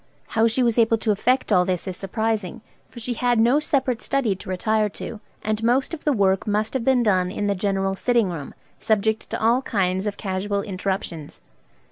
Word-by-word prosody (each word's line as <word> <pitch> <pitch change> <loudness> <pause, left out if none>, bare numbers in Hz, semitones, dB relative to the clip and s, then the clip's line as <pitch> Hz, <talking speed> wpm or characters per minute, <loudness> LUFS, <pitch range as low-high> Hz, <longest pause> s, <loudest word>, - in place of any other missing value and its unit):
How 225 0 +3
she 230 +3 +1
was 235 -1 +2
able 225 0 +4
to 220 0 0
effect 250 +5 +1
all 180 -3 +5
this 180 0 -2
is 185 - -3
surprising, 210 0 -2 0.3
for 240 - -11
she 245 +2 -2
had 245 0 +1
no 240 +6 +4
separate 265 -5 0
study 255 -8 0
to 185 - -10
retire 215 +3 +1
to, 215 +2 -7 0.2
and 215 +1 -1
most 250 +7 +2
of 325 - -7
the 300 - +3
work 195 -6 +2
must 210 +1 0
have 260 -3 -1
been 255 -1 +3
done 185 -4 +2
in 205 +2 -3
the 200 - +2
general 195 0 -1
sitting 235 -3 +1
room, 150 -5 -7 0.2
subject 220 0 0
to - - -3
all 235 +3 +3
kinds 190 -4 0
of 200 - -3
casual 200 0 -2
interruptions. 190 -5 -4
215 Hz, 200 wpm, -23 LUFS, 195-235 Hz, 0.3 s, all